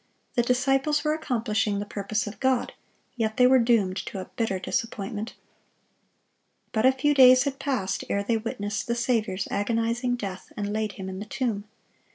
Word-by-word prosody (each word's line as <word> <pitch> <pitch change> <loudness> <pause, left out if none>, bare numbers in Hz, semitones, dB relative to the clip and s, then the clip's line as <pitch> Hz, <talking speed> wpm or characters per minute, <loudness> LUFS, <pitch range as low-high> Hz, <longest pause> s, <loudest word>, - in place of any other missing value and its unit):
The 240 - +3
disciples 270 +4 +2
were 305 0 +2
accomplishing 225 -8 0
the 205 - -3
purpose 205 0 -2
of 210 0 -8
God; 260 -2 +1 0.4
yet 220 -1 -1
they 250 - +6
were 260 +1 +6
doomed 225 -6 +2
to 195 - -5
a 185 - -8
bitter 220 -5 0
disappointment. 210 +2 -3 1.4
But 220 +2 +3
a - - +7
few 270 +3 +1
days 255 -2 +8
had 275 -1 -3
passed 260 -9 -1
ere 200 - 0
they 225 +2 +1
witnessed 205 -2 -3
the 235 - 0
Saviour's 225 -5 0
agonizing 230 +4 0
death, 195 -5 -6
and 205 0 -2
laid 215 -1 -1
Him 190 -1 -7
in 190 0 -5
the 205 - -5
tomb. 215 -4 -2
225 Hz, 175 wpm, -26 LUFS, 205-255 Hz, 1.4 s, days